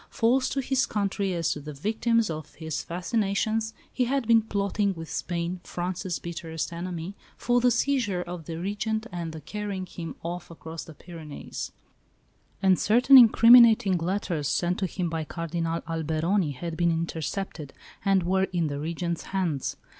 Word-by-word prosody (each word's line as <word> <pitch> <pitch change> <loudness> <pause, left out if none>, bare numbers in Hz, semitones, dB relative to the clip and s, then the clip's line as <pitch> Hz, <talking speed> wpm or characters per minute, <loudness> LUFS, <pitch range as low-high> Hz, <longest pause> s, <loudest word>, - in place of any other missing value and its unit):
False 255 +1 +2
to 275 - -1
his 265 0 +1
country 200 -1 -1
as 165 -1 0
to - - -3
the 150 0 -8
victims 225 - +1
of 155 -1 -7
his 160 -2 -4
fascinations, 215 +4 -1 0.2
he 250 - +1
had 270 0 0
been 230 -1 +6
plotting 200 -2 -1
with 165 -1 -8
Spain, 175 +1 -3
France's 180 0 -3
bitterest 165 0 -5
enemy, 175 +1 -5 0.2
for 245 0 +2
the 250 - +5
seizure 235 -7 +1
of 175 -2 -7
the 165 - -5
Regent 210 +5 -2
and 170 -2 -4
the 160 - -7
carrying 200 +2 -4
him 170 -2 -7
off 175 +1 -5
across 165 -1 -8
the 160 - -12
Pyrenees; 160 -3 -8 0.9
and 190 -1 +5
certain 245 +5 +5
incriminating 235 -3 +8
letters 170 -4 -1
sent 175 +3 0
to 190 - 0
him 180 0 -3
by 165 -1 -2
Cardinal 165 +1 -3
Alberoni 160 +1 0
had 165 +5 -5
been 170 +1 +2
intercepted, 165 -1 -3 0.3
and 195 -2 +3
were 190 +2 +2
in 170 -5 -1
the 145 0 -4
Regent's 170 +2 -3
hands. 175 -8 -1
180 Hz, 160 wpm, -27 LUFS, 165-210 Hz, 0.9 s, incriminating